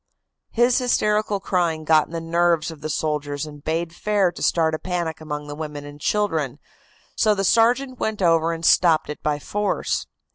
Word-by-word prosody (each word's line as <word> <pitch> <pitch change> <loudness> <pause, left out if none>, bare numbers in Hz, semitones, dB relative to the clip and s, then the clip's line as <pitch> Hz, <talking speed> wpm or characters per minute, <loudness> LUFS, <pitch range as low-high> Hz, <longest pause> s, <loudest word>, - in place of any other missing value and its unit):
"His 240 +3 +3
hysterical 210 -4 +1
crying 170 -5 -1
got 155 0 +4
in - - -17
the 165 - -3
nerves 165 -1 +1
of 155 -2 -12
the 155 - -4
soldiers 150 -2 -2
and 145 -2 -11
bade 165 +1 -2
fair 200 -1 +1
to - - -11
start 160 -2 +2
a 155 - -2
panic 170 -3 -3
among 150 -1 -5
the 145 - -7
women 150 -1 -6
and 145 0 -11
children, 165 -11 0 0.6
so 215 -1 +3
the 195 - -1
sergeant 245 +5 +2
went 220 -1 -2
over 165 -2 +3
and 165 0 -4
stopped 165 -4 +4
it 150 - -9
by 150 -1 0
force. 205 +7 -2
165 Hz, 185 wpm, -22 LUFS, 155-200 Hz, 0.6 s, got